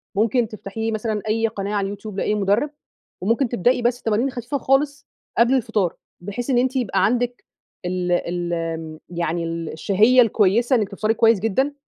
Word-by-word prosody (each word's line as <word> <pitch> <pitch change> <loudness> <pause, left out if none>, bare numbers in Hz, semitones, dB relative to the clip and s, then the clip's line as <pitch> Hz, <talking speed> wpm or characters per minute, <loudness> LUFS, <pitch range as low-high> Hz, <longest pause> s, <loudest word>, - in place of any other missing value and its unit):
ممكن 230 +3 +2
تفتحي 220 +1 -4
مثلًا 220 -1 -2
أي 225 +1 +2
قناة 200 -1 -4
على 200 -1 0
اليوتيوب 200 0 -6
لأي 210 - +1
مدرب، 210 +8 +1 0.5
وممكن 230 +6 +1
تبدئي 245 +3 +2
بس 240 +1 0
تمارين 230 +5 +1
خفيفة 255 +3 -3
خالص 280 +2 0 0.3
قبل 240 +2 +5
الفطار، 205 -8 0 0.3
بحيث 205 +8 -5
إن 250 - +3
أنتِ 260 +1 0
يبقى 245 -6 +1
عندِك 245 +1 -1 0.4
ال 180 0 -1
ال 165 -2 -2
يعني 170 -1 -2
ال 165 -1 -4
الشهية 215 +9 +4
الكويِّسة 230 +3 +3
إنِّك 210 -3 -1
تفطري 215 +2 0
كويس 225 -2 +4
جدًا، 260 +8 0
215 Hz, 160 wpm, -22 LUFS, 190-245 Hz, 0.5 s, قبل